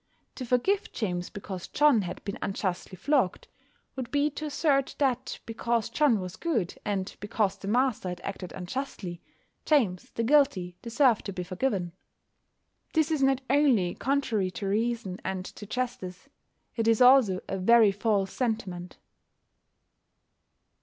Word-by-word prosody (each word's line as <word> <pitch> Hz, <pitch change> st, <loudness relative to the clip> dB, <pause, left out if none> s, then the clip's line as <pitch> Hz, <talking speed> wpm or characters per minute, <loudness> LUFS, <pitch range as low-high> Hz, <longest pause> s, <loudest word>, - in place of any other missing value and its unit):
To 255 Hz, -, -7 dB
forgive 380 Hz, -, +1 dB
James 180 Hz, -5 st, -3 dB
because 190 Hz, -3 st, -7 dB
John 295 Hz, -7 st, +4 dB
had 175 Hz, -3 st, -6 dB
been 200 Hz, -, -5 dB
unjustly 190 Hz, -1 st, -3 dB
flogged 250 Hz, -, 0 dB, 0.5 s
would 260 Hz, -2 st, -5 dB
be 290 Hz, +1 st, +1 dB
to 305 Hz, +2 st, -6 dB
assert 285 Hz, -2 st, +1 dB
that 260 Hz, -3 st, 0 dB
because 230 Hz, 0 st, -1 dB
John 260 Hz, -4 st, +3 dB
was 185 Hz, -1 st, -6 dB
good, 230 Hz, -, -1 dB
and 195 Hz, -2 st, -2 dB
because 205 Hz, -1 st, 0 dB
the 195 Hz, -, -8 dB
master 240 Hz, -3 st, +1 dB
had 180 Hz, 0 st, -5 dB
acted 190 Hz, -2 st, -6 dB
unjustly, 185 Hz, -3 st, -5 dB, 0.4 s
James 220 Hz, -, +1 dB
the 230 Hz, -, 0 dB
guilty 225 Hz, -10 st, +3 dB
deserved 235 Hz, 0 st, +2 dB
to 200 Hz, -, -4 dB
be 180 Hz, -, -4 dB
forgiven. 185 Hz, -1 st, -2 dB, 1.0 s
This 315 Hz, -1 st, +2 dB
is 310 Hz, -3 st, +1 dB
not 270 Hz, -1 st, +3 dB
only 260 Hz, -11 st, +3 dB
contrary 255 Hz, -8 st, 0 dB
to 195 Hz, +2 st, -5 dB
reason 225 Hz, -2 st, -1 dB
and 185 Hz, -1 st, -3 dB
to 210 Hz, -, -9 dB
justice: 245 Hz, -3 st, -4 dB, 0.5 s
it 225 Hz, -1 st, 0 dB
is 225 Hz, -1 st, +4 dB
also 250 Hz, -7 st, +6 dB
a 195 Hz, -, -3 dB
very 225 Hz, +2 st, +6 dB
false 200 Hz, -1 st, 0 dB
sentiment. 195 Hz, -8 st, -3 dB
225 Hz, 140 wpm, -28 LUFS, 185-265 Hz, 1.0 s, also